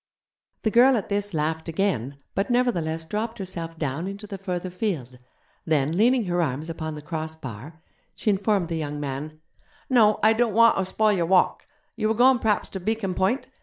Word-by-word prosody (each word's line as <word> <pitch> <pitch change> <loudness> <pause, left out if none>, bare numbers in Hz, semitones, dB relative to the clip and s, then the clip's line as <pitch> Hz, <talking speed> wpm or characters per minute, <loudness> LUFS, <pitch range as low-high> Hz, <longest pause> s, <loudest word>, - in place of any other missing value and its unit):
The 220 - +1
girl 250 +3 +6
at 205 - -4
this 205 0 -1
laughed 160 0 -2
again, 155 - -1 0.2
but 195 - -1
nevertheless 170 -11 0
dropped 220 +6 -3
herself 170 -4 -6
down 155 +3 -2
into 200 +2 -7
the 195 -1 -7
further 180 -1 -4
field; 160 - -3 0.4
then, 155 0 +1
leaning 235 +3 +3
her 175 -1 0
arms 155 +1 -2
upon 160 -1 -5
the 150 - -9
cross 160 0 -4
bar, 150 +3 -9 0.3
she 215 - +1
informed 195 -3 +1
the 165 - -2
young 150 -2 -4
man: 145 +2 -5 0.5
'No, 215 -4 +5
I 220 +1 +6
don't 225 -2 +1
wanter 230 -4 +5
spoil 215 +3 +2
your 175 -4 0
walk. 185 0 +2 0.3
You 220 -1 0
were 220 - +1
goin' 250 +2 +5
p'raps 215 -3 0
ter 190 - -4
Beacon 205 0 -2
Point? 190 +11 0
185 Hz, 185 wpm, -25 LUFS, 160-215 Hz, 0.5 s, girl